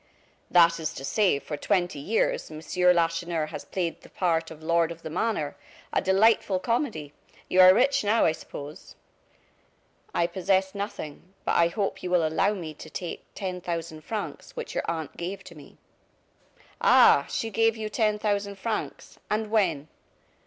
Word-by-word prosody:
"That 170 -1 +5
is 155 -2 -3
to 135 - -6
say, 200 -2 +2
for 150 +2 -6
twenty 175 -2 0
years, 210 +11 0
Monsieur 180 +3 +1
Lacheneur 165 -1 0
has - - -7
played 175 -3 -3
the - - -16
part 165 -3 0
of 160 -1 -12
lord 170 0 +2
of 165 0 -10
the 160 - -6
manor. 175 -5 -1 0.4
A - - +2
delightful 195 0 +3
comedy. 185 - -2 0.3
You 185 - +5
are 185 0 +10
rich 250 +7 +3
now, 215 +2 +3
I - - +4
suppose." 150 +1 -9 1.2
"I 170 - +1
possess 190 +2 0
nothing. 195 -3 -7
But - - +1
I 170 - +5
hope 195 +3 -2
you 180 - -4
will 175 -2 +3
allow 195 +6 +1
me 165 -5 -6
to - - -11
take 175 -2 -5
ten 185 -2 -4
thousand 165 -2 -4
francs, 215 +3 -6
which 485 - -6
your - - -2
aunt 160 -3 -4
gave 190 +3 -5
to 170 - -12
me." 150 - -15 1.0
"Ah! - - +6
she 225 - -3
gave 225 +1 +2
you 215 -1 -3
ten 215 -1 +1
thousand 205 -1 -1
francs? 220 +3 -4
And 215 0 -1
when?" 170 -10 +1
180 Hz, 165 wpm, -26 LUFS, 165-205 Hz, 1.2 s, are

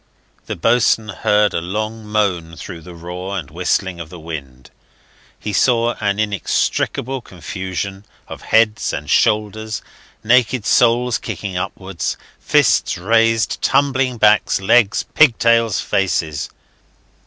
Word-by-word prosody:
The - - -3
boatswain 115 +2 +2
heard 105 +1 +1
a 85 - -1
long 110 +4 -4
moan 95 -6 -1
through 85 0 -9
the 85 +2 -12
roar 90 +3 -6
and 75 -7 -6
whistling 90 +1 -1
of 85 -2 -7
the 90 - -10
wind; 70 -6 -9 0.7
he 105 - -5
saw 120 +2 +2
an 100 -1 0
inextricable 110 +5 -1
confusion 95 +1 -6 0.2
of - - -9
heads 110 -1 +2
and 75 - -5
shoulders, 110 +5 0 0.4
naked 125 -1 +2
soles 120 0 +3
kicking 100 -3 -5
upwards, 95 +1 -4 0.2
fists - - +2
raised, 115 +4 +1
tumbling 135 -2 +1
backs, 105 -2 +3
legs, 100 +1 +3
pigtails, 115 -6 +4
faces. 80 -6 -1
105 Hz, 120 wpm, -18 LUFS, 90-115 Hz, 0.7 s, pigtails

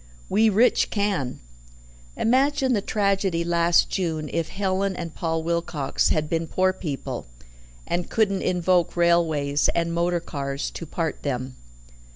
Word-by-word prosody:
We 220 +2 +4
rich 220 +5 +3
can. 200 - -1 0.8
Imagine 265 +2 +2
the 205 - +1
tragedy 195 -4 0
last 170 0 +3
June, 160 -5 -2
if 165 -1 -1
Helen 195 0 -1
and 170 -2 -6
Paul 165 -1 -2
Wilcox 170 -3 0
had 155 -1 +1
been 165 +1 -1
poor 185 +2 +1
people, 150 - -5 0.6
and 175 0 -2
couldn't 200 -4 +1
invoke 180 -1 +1
railways 160 -4 +2
and 170 0 0
motor 175 +1 +1
cars 140 -4 -4
to 165 - -7
part 160 0 -3
them." 130 -2 -3
170 Hz, 135 wpm, -24 LUFS, 160-195 Hz, 0.8 s, We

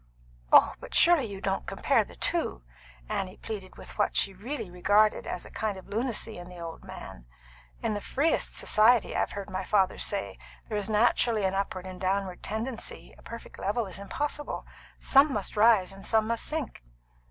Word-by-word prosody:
"Oh, - - +7
but - - -8
surely 340 -6 +5
you 200 -3 -7
don't 195 0 -2
compare - - +2
the - - -14
two!" - - -1 0.4
Annie 185 - -3
pleaded 195 -4 -7
with - - -11
what - - +2
she 195 - +2
really 225 +6 -5
regarded 205 +4 +3
as 180 - -4
a - - -12
kind 215 -3 -2
of 190 - -12
lunacy 225 -2 -1
in 175 0 -9
the 180 - -11
good 170 -1 -8
man. - - -10 0.6
"In - - +1
the 205 - -3
freest 290 +9 0
society, 220 +1 +4
I've - - 0
heard 200 -1 -5
my 185 0 -2
father 195 -3 +2
say, 200 -1 -2 0.3
there 215 - -1
is 205 - -3
naturally 220 0 +3
an 190 - +1
upward 195 -1 -2
and 185 0 -8
downward 190 -1 -1
tendency; 225 +3 -4
a - - -18
perfect 230 0 -10
level 215 +4 0
is 190 -1 -6
impossible. 295 +8 -3 0.3
Some 280 +2 +5
must 210 -4 -2
rise, 210 -3 +5
and 195 0 -12
some 220 -1 +2
must 230 +1 -2
sink." 305 - -3
205 Hz, 185 wpm, -28 LUFS, 190-230 Hz, 0.6 s, Oh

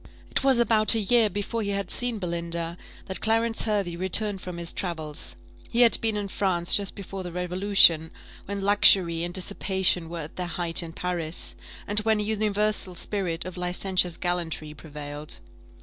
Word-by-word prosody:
It - - 0
was 270 -2 +4
about 225 -2 +3
a - - +1
year 220 +1 +3
before 205 +3 -3
he 200 - -3
had 200 -2 -2
seen 245 -2 +1
Belinda 170 -2 -4 0.3
that 190 - -3
Clarence 225 +1 +2
Hervey 200 -6 -1
returned 190 +2 +1
from 180 -2 -7
his 170 0 -5
travels; 160 -5 -3 0.3
he 235 - +1
had 235 -2 +6
been 220 -2 0
in 205 -1 -3
France 180 -3 +1
just 200 -1 0
before 195 -1 -7
the 180 -1 -7
Revolution, 180 -2 +4 0.4
when 200 0 -5
luxury 195 -4 +5
and 175 - -3
dissipation 185 -2 0
were 170 -1 -5
at 150 - -10
their 180 -1 -3
height 175 -1 +1
in 165 -1 -8
Paris, 175 -2 -3 0.3
and 205 +1 +3
when 220 0 +1
a - - 0
universal 210 -3 -1
spirit 175 -3 -2
of 185 0 -7
licentious 180 -1 0
gallantry 170 -4 -3
prevailed. 150 -1 -8
185 Hz, 170 wpm, -25 LUFS, 170-205 Hz, 0.4 s, had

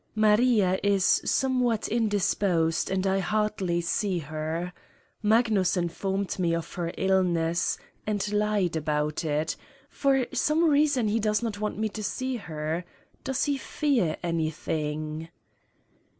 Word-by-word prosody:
Maria 215 -3 +4
is 200 -2 +3
somewhat 250 -4 +1
indisposed 200 -6 +1
and 190 0 0
I 195 0 +2
hardly 195 -3 0
see 185 +2 0
her. 160 +3 -4 0.5
Magnus 215 -4 +3
informed 190 +3 -2
me 170 -2 +2
of 165 -1 -5
her 170 -1 -3
illness 175 -3 +1 0.3
and 210 -1 -1
lied 210 -4 +1
about 150 0 -1
it: 155 +1 -1 0.4
for 270 -2 +2
some 320 +3 +2
reason 285 -5 +3
he 215 +2 +1
does 215 +1 +1
not 215 -3 -3
want 210 0 -2
me 220 +1 0
to 215 +1 -6
see 255 +5 -2
her. 160 -3 -4 0.4
Does 265 - -1
he 285 -1 0
fear 260 - 0
anything? 155 -1 -2
195 Hz, 125 wpm, -27 LUFS, 165-220 Hz, 0.5 s, Maria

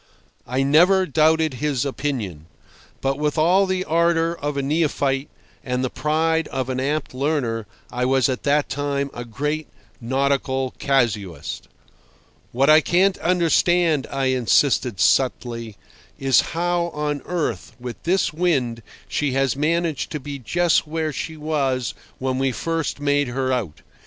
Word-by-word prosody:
I 130 +2 0
never 180 +7 +5
doubted 160 -1 +2
his 140 0 -1
opinion. 115 - -4 0.5
But 135 +1 -1
with 150 +1 -1
all 180 +5 +4
the 185 0 -1
ardour 165 0 +2
of 145 0 -2
a 140 - 0
neophyte 140 -2 0 0.3
and 125 -1 -2
the 130 - -2
pride 160 +1 0
of 130 -1 -3
an 130 0 -2
apt 145 +2 -2
learner 130 -6 -1 0.2
I 125 0 -1
was 130 -1 +3
at 130 -2 -2
that 145 0 +2
time 140 0 -2
a 120 - -6
great 150 +7 -3 0.3
nautical 130 +1 0
casuist. 115 - -1 0.8
"What 135 +3 +2
I 155 +1 +7
can't 185 +4 +2
understand," 175 -3 +2
I 135 -1 0
insisted 125 -3 +2
subtly, 115 -4 +1 0.4
"is 135 -3 +4
how 175 +1 -1
on 150 -1 -2
earth, 170 -8 -3
with 120 -1 -7
this 185 -1 +1
wind, 135 -9 0 0.3
she 145 -3 -1
has 135 -2 +1
managed 160 +1 0
to 150 - -2
be 140 0 -7
just 170 +7 +1
where 155 -1 -2
she 155 +7 -5
was 140 -5 -1 0.2
when 130 0 -2
we 135 0 +1
first 165 +1 -2
made 145 -1 +1
her 130 +1 -1
out. 95 - -3
140 Hz, 145 wpm, -22 LUFS, 130-160 Hz, 0.8 s, I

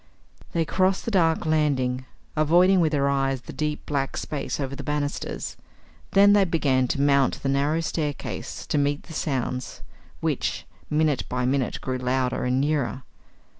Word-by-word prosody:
They 165 -1 +1
crossed 185 +3 +1
the 230 - -2
dark 165 -4 +2
landing, 135 -5 +1 0.3
avoiding 175 +5 +5
with 160 -3 +3
their 140 -2 +2
eyes 135 -2 0
the - - -10
deep 150 -1 -3
black 140 -2 -2
space 150 -1 -3
over 135 -1 -3
the - - -6
banisters. 150 -1 -3 0.6
Then 200 +1 +7
they 205 -1 +5
began 140 -8 +2
to 140 - -1
mount 140 -2 +2
the 135 - 0
narrow 145 +4 +1
staircase 150 -3 -4
to 150 - 0
meet 145 +1 0
the 165 - -11
sounds 130 -4 -3 0.4
which, - - -1 0.2
minute 150 -2 +1
by 125 0 -1
minute, 130 0 0
grew 130 -1 -2
louder 125 0 0
and 125 +1 +1
nearer. 135 -4 0
145 Hz, 160 wpm, -25 LUFS, 130-155 Hz, 0.6 s, Then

